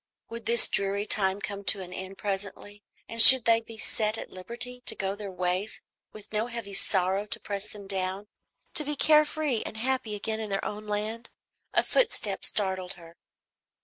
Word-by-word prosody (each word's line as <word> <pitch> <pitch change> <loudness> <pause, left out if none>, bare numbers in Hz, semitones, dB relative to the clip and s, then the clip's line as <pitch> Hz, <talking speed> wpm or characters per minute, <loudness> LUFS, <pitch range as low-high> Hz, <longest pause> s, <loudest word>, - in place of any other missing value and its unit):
Would 230 -1 -8
this 235 0 +3
dreary 200 +1 -2
time 195 -2 +1
come 200 -1 -6
to 195 - +5
an 180 0 -11
end 190 +1 -9
presently, 205 +1 -7 0.3
and 230 0 +5
should 260 0 +12
they 230 0 +3
be 225 0 -14
set 215 0 -1
at - - -9
liberty 235 +6 -4
to - - +3
go 195 0 -3
their 205 0 -8
ways 185 +2 -3 0.3
with 215 0 -14
no 215 +2 -2
heavy 230 -4 -7
sorrow 195 +1 0
to 230 +1 +1
press 200 0 -5
them 205 -1 -12
down, 190 +1 -4 0.5
to 310 - +1
be 295 0 -5
care 305 +1 +3
free 295 -6 -3
and 220 - -9
happy 255 -2 -3
again 220 +2 -5
in 215 -1 -6
their 195 0 -3
own 210 +1 -7
land? 215 +3 -5 0.5
A - - +3
footstep - - -1
startled 190 -3 -2
her. 170 -1 -16
210 Hz, 185 wpm, -26 LUFS, 195-230 Hz, 0.5 s, should